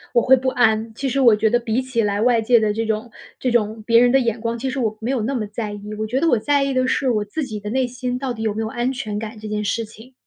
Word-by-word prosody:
我 235 - +6
会 260 +3 +6
不 260 0 -1
安， 225 -3 +1
其 270 +5 -3
实 270 +1 0
我 235 -4 +6
觉 220 +1 +2
得 240 - +3
比 235 +1 -1
起 255 -3 -1
来 205 -1 0
外 235 -1 +3
界 235 +1 +4
的 215 -1 +1
这 225 +2 -2
种 220 +1 -3 0.3
这 255 - 0
种 220 -2 0
别 230 +1 +5
人 245 0 +4
的 270 - +5
眼 230 -3 -1
光， 230 0 -2
其 265 +3 -2
实 260 - -4
我 220 -3 -1
没 225 - -4
有 260 -3 0
那 240 +6 -2
么 225 -5 -2
在 210 +1 -5
意。 205 +1 -8
我 215 - -2
觉 245 +5 -1
得 330 - +1
我 245 - +4
在 285 +5 +1
意 275 0 -1
的 255 0 +1
是 265 0 +1
我 215 -4 +1
自 275 +9 -4
己 215 -4 -6
的 210 - -5
内 255 +2 0
心 250 0 -4
到 265 -2 -3
底 220 - -8
有 215 -2 0
没 220 - -3
有 220 - -2
安 240 +3 -1
全 220 -6 -4
感 220 +1 -6
这 215 - -8
件 210 0 -2
事 225 +2 -1
情。 225 +4 -15
230 Hz, 345 characters per minute, -21 LUFS, 215-255 Hz, 0.3 s, 我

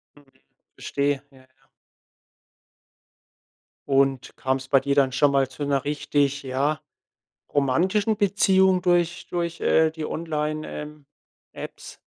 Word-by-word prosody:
Mhm. 145 -1 -20 0.5
Verstehe. 140 -1 -1
Ja, 135 - -19
ja. 130 - -24 2.4
Und 135 -2 +1
kam's 130 0 -2
bei 135 - +4
dir 140 +1 -1
dann 135 -2 +3
schon 140 +2 +3
mal 135 -1 +2
zu 135 +3 -7
'ner 140 -1 0
richtig, 145 -1 0
ja, 140 +3 -1 0.7
romantischen 185 - +1
Beziehung 190 -2 +3
durch 175 -1 +1
durch, 170 -1 -3
äh, 160 0 +4
die 160 -1 -6
Online 155 -1 -3
ähm, 150 -1 -8 0.5
Apps? - - -9
145 Hz, 120 wpm, -24 LUFS, 135-170 Hz, 2.4 s, bei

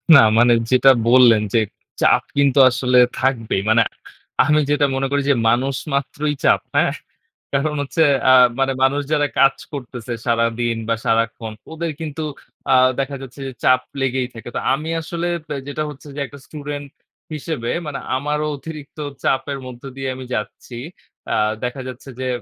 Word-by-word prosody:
না - - +10 0.2
মানে 120 +1 +6 0.2
যেটা 130 +1 +6 0.2
বললেন 120 -3 +6
যে 115 - +5 0.4
চাপ - - +5 0.2
কিন্তু 140 -1 +4
আসলে 125 0 +1 0.2
থাকবেই। 115 -7 0
মানে 115 +1 +5 0.6
আমি 150 +1 +3
যেটা 145 0 +3
মনে 135 0 0
করি 145 0 +2
যে 140 - +5
মানুষ 130 +4 +1 0.2
মাত্রই 145 +2 -1
চাপ, - - +4
হ্যাঁ? - - +3 0.6
কারণ 150 +2 0
হচ্ছে 160 +4 +1 0.3
আ - - +8 0.3
মানে 135 0 +2
মানুষ 140 +2 +2
যারা 145 -1 +2
কাজ 135 0 +5 0.2
করতেছে 125 -3 -6
সারাদিন 115 0 +1
বা 115 - +3
সারাক্ষণ 115 0 0 0.2
ওদের 165 0 -3
কিন্তু 155 0 -4 0.5
আ - - +6 0.2
দেখা 135 +1 -2
যাচ্ছে 135 0 -11
যে 135 - -6
চাপ 130 0 +5 0.2
লেগেই 130 -1 0
থাকে। 115 +1 -9
তো - - 0
আমি 155 +4 -3
আসলে 170 +2 -3 0.2
পে 150 - -4
যেটা 145 +2 -3
হচ্ছে 145 0 -11
যে - - -5
একটা 140 +1 -12
স্টুডেন্ট 145 -1 -6 0.5
হিসেবে 150 -5 -3 0.2
মানে 145 - -4 0.2
আমারও 150 +2 -1
অতিরিক্ত 150 0 -10 0.3
চাপের 135 +1 0
মধ্য 125 -1 -11
দিয়ে 135 0 -3
আমি 130 0 -8
যাচ্ছি। 110 +3 -5 0.6
আ - - +2 0.3
দেখা 125 +2 -3
যাচ্ছে 130 +2 -9
যে 130 - -2
135 Hz, 165 wpm, -20 LUFS, 125-145 Hz, 0.6 s, না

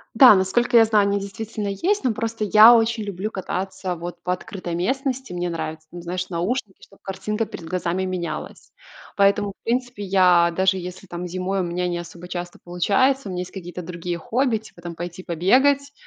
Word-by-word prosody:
Да, 250 -1 +9
насколько 240 +6 +1
я 225 -1 +8
знаю, 215 -2 +3
они 200 0 +1
действительно 205 +1 -5
есть, 360 - 0
но 250 -3 +1
просто 225 0 -3
я 215 +3 +8
очень 225 -1 +2
люблю 200 +1 -4
кататься 190 -2 -4
вот 175 +1 -7
по 180 - 0
открытой 185 -3 -6
местности. 260 +4 -2
Мне 175 0 -2
нравятся, 160 -1 -5
там, 175 - -8
знаешь, 180 +2 -4
наушники, 190 +4 -3
чтобы 195 - -18
картинка 210 +3 -3
перед 180 -5 -9
глазами 180 +1 -1
менялась. 180 -2 -5 0.4
Поэтому, 200 0 +3
в - - -23
принципе, 245 -2 -2
я 180 -3 +4
даже 190 0 +2
если 180 +1 -7
там 175 0 -6
зимой 185 +2 -2
у - - +1
меня 180 +1 -2
не 175 -1 -2
особо 175 +1 -9
часто 175 0 -6
получается, 205 +9 +1
у - - -4
меня 180 - -3
есть 180 - -7
какие-то 180 -2 -7
другие 170 0 -4
хобби, 240 +6 0
типа 210 -5 -15
там 170 -1 -7
пойти 175 +2 -7
побегать, 270 - +2
190 Hz, 190 wpm, -23 LUFS, 175-220 Hz, 0.4 s, Да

